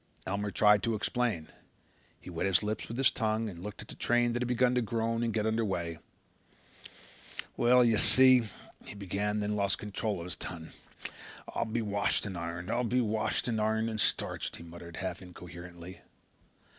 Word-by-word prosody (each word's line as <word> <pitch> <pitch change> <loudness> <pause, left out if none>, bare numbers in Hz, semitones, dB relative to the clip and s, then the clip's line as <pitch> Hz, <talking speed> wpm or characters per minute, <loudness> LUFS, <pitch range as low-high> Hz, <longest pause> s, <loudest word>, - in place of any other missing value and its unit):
Elmer 100 +2 -1
tried 105 0 +5
to 115 -1 0
explain. 110 -7 -1 0.7
He - - -10
wet 85 +3 -1
his 95 +1 +3
lips 105 0 -2
with 115 - -6
his 135 -1 +4
tongue 110 -1 0
and 90 -5 -7
looked 105 +2 -7
at - - -16
the - - -8
train 120 0 +2
that 120 - -1
had 125 - 0
begun 125 0 +3
to 125 - +2
groan 115 +1 -1
and 115 -1 +1
get 110 -1 0
under 110 +1 +1
way. 85 -5 -2 1.6
"Well, 125 +1 +5
you 115 -2 +3
see," 130 -3 +6 0.3
he - - -9
began, 100 +1 -2
and 105 0 -1
then 105 +1 -1
lost 100 -1 +1
control 105 -1 -3
of 85 - -6
his 90 - -4
tongue. 80 -2 -7 0.8
"I'll - - 0
be 115 +1 -1
washed 100 0 +1
and 100 -2 -4
ironed. 85 +3 -4
I'll 120 +1 +1
be 125 +2 +1
washed 110 -1 0
and 110 -3 0
ironed 110 +1 +1
and 110 -1 -1
starched," - - 0
he - - -10
muttered 85 0 -10
half 95 +2 -4
incoherently. 90 0 -10
105 Hz, 190 wpm, -31 LUFS, 95-115 Hz, 1.6 s, see